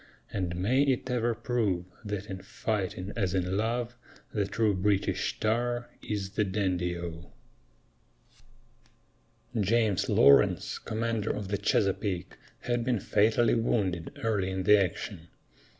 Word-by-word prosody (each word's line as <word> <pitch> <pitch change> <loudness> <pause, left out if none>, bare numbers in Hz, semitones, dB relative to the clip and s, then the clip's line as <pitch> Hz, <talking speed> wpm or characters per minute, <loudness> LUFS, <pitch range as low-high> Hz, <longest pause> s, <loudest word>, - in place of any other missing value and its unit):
And 90 -3 -2
may 110 +10 +2
it 130 -2 +1
ever 120 -1 +1
prove 110 -7 -1 0.2
That 105 -2 -4
in 95 -1 -6
fighting 100 -2 -3
as 95 -4 0
in 90 0 0
love 115 +3 -1 0.4
The 105 -3 0
true 105 +1 +1
British 100 +1 0
tar 120 +2 0
is 100 -3 -3
the 105 +1 +1
dandy 90 -3 -1
O! 85 -1 -7 2.3
James 105 -1 +2
Lawrence, 70 - +4
commander 115 -1 -2
of 100 -3 -3
the 100 - 0
Chesapeake, 100 -2 0 0.3
had 120 -1 -1
been 120 -2 +1
fatally 110 +4 +3
wounded 95 -7 -1
early 105 -4 +1
in 95 0 -2
the 105 +1 +6
action. 85 -1 -5
105 Hz, 125 wpm, -29 LUFS, 95-115 Hz, 2.3 s, the